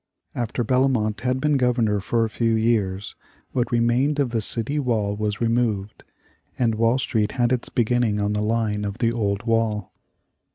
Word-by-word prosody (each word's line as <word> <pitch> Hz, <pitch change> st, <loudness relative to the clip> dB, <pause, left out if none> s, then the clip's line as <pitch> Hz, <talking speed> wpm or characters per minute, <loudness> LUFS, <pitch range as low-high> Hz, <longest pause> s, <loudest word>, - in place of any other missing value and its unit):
After 120 Hz, +1 st, -2 dB
Bellomont 125 Hz, -3 st, +1 dB
had 130 Hz, +1 st, 0 dB
been 150 Hz, 0 st, +2 dB
Governor 120 Hz, -5 st, +1 dB
for 115 Hz, +4 st, 0 dB
a -, -, -4 dB
few 115 Hz, +1 st, +1 dB
years, 105 Hz, -4 st, 0 dB, 0.4 s
what 125 Hz, -1 st, -1 dB
remained 120 Hz, +5 st, +2 dB
of 135 Hz, -4 st, +1 dB
the 115 Hz, -2 st, 0 dB
city 120 Hz, +7 st, +1 dB
wall 110 Hz, -6 st, 0 dB
was 105 Hz, 0 st, -2 dB
removed, 115 Hz, -4 st, -1 dB, 0.5 s
and 115 Hz, -3 st, +1 dB
Wall 115 Hz, +3 st, +2 dB
Street 110 Hz, -5 st, -1 dB
had 120 Hz, -1 st, +1 dB
its 125 Hz, -2 st, 0 dB
beginning 120 Hz, -2 st, +1 dB
on 105 Hz, 0 st, 0 dB
the 105 Hz, -, -1 dB
line 105 Hz, -1 st, 0 dB
of 100 Hz, 0 st, -4 dB
the 115 Hz, -1 st, +1 dB
old 100 Hz, -3 st, -1 dB
wall. 115 Hz, -3 st, 0 dB
115 Hz, 170 wpm, -23 LUFS, 105-125 Hz, 0.5 s, been